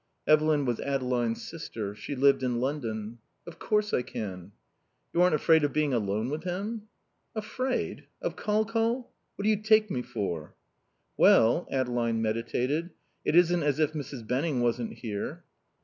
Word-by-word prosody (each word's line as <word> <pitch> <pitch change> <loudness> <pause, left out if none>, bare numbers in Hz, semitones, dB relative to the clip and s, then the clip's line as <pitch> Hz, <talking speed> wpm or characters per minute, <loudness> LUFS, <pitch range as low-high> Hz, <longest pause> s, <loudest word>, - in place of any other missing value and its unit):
Evelyn 155 -1 +4
was 120 -3 -1
Adeline's 125 -4 -1
sister. 110 -11 -5
She 105 +7 -6
lived 135 0 +4
in 125 -2 0
London. 120 -5 -3 0.3
"Of 170 - -11
course 210 0 0
I - - +3
can." 95 -5 -6 0.6
"You 175 - +3
aren't 180 -3 +5
afraid 160 0 +4
of 145 - +1
being 150 -3 +1
alone 110 +2 0
with 155 +2 -3
him?" 205 +5 -4 0.5
"Afraid? 255 +4 -2
Of - - -3
Col 215 +1 +1
Col? 230 +3 -1 0.2
What 200 - -5
do 210 - +3
you 215 -1 +2
take 215 -1 +4
me 125 - -1
for?" 85 -10 -4 0.6
"Well 120 +10 +5
" - - -17
Adeline 120 -3 0
meditated. 120 +8 -1 0.3
"It - - +1
isn't 175 0 +5
as 145 -2 +1
if 155 -1 +1
Mrs. 140 -6 -6
Benning 135 +2 0
wasn't 120 - 0
here." 105 - -5
140 Hz, 160 wpm, -28 LUFS, 115-175 Hz, 0.6 s, aren't